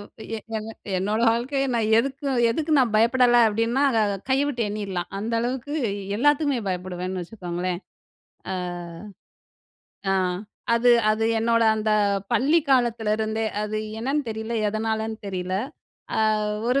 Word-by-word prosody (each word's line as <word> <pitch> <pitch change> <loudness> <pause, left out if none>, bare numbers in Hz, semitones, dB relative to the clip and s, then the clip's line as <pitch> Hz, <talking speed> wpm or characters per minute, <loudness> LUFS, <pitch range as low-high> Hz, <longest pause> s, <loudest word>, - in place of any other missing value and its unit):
அ - - -8 0.3
"எ - - -4 0.2
என் 215 0 -5 0.3
என்னோட 210 +4 0
வாழ்க்கையை 270 +4 -1
நான் 220 -2 +1
எதுக்கும் 270 +1 -1
எதுக்கும் 305 +4 +1
நான் 245 -4 +1
பயப்படலை" 240 +1 +5
அப்படின்னா 230 +5 0
அத 215 -4 +1
கைய 270 +1 +3
விட்டு 245 -5 -2
எண்ணிறலாம். 195 -4 -4
அந்த 220 +3 -3
அளவுக்கு, 255 +4 -3 0.4
எல்லாத்துக்குமே 285 +1 +2
பயப்படுவேன்னு 180 0 -3
வச்சுக்கோங்களேன். 175 -2 -4 0.7
அ. - - -1 1.6
அ, - - +3 0.6
அது 240 +1 +4 0.2
அது 215 +1 +1 0.2
என்னோட 230 0 +2
அந்த 215 0 -1 0.4
பள்ளி 275 +8 +4
காலத்திலருந்தே, 220 -3 +1 0.2
அது 210 0 -2 0.2
என்னன்னு 275 +5 0
தெரியல, 220 +1 -5 0.2
எதனாலன்னு 220 +1 -2
தெரியல. 185 -1 -3 0.6
"அ - - +2 0.5
ஒரு 265 +2 +3
225 Hz, 125 wpm, -24 LUFS, 210-250 Hz, 1.6 s, பயப்படலை